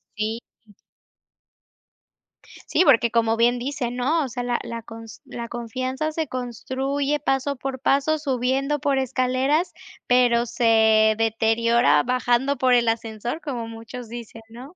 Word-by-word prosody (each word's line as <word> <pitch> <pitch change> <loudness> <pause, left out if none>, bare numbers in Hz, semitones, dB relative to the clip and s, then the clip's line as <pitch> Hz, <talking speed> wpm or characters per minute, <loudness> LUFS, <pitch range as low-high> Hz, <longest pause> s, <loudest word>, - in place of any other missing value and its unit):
Sí. 215 +1 -2 2.3
Sí, - - +3
porque 235 -4 +4
como 225 -1 +1
bien 240 +1 +3
dicen, 245 -1 -3
¿no? 300 +6 +1
O - - -3
sea, 245 +1 -4
la 245 -1 -1
la 230 0 -6
cons 225 -1 -11
la 235 -1 -7
confianza 255 +5 -3
se 315 0 -3
construye 265 +4 -2
paso 270 0 -1
por 265 0 -5
paso, 280 +4 +2
subiendo 275 +1 -1
por 280 -1 0
escaleras, 265 +5 0 0.3
pero 245 -1 +3
se 220 -2 +3
deteriora 225 +1 +2
bajando 250 +2 +1
por 255 0 +3
el 240 -1 +3
ascensor, 225 +5 -3
como 245 -6 -5
muchos 230 +1 -9
dicen, 230 -1 -9
¿no? 255 +9 -12
245 Hz, 135 wpm, -23 LUFS, 230-270 Hz, 2.3 s, porque